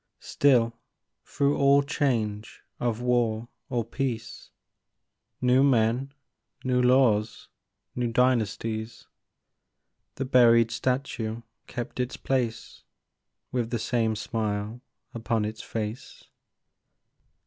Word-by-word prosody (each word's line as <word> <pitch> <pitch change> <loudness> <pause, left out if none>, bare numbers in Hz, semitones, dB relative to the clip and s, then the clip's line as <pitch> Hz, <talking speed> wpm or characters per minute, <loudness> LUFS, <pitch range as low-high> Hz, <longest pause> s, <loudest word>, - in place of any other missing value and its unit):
Still 120 -5 +2 0.5
through 140 0 0
all 140 +1 +5
change 115 -8 -2 0.2
of 120 -1 -1
war 120 -2 0 0.2
or 120 -4 -1
peace, 115 -2 -4 0.9
New 125 +1 +4
men, 125 0 +2 0.5
new 125 -1 +2
laws, 125 -4 +2 0.5
new 125 -1 0
dynasties, 115 -2 0 1.1
The 135 - -3
buried 115 -3 +5
statue 120 -2 -2 0.2
kept 125 +2 -6
its 125 +1 -2
place, 125 -4 -2 0.7
With 120 -3 -1
the 120 - -1
same 115 -1 0
smile 105 +1 -3 0.3
upon 115 -2 -1
its 110 +1 -5
face. 110 +1 -6
120 Hz, 95 wpm, -27 LUFS, 110-130 Hz, 1.1 s, all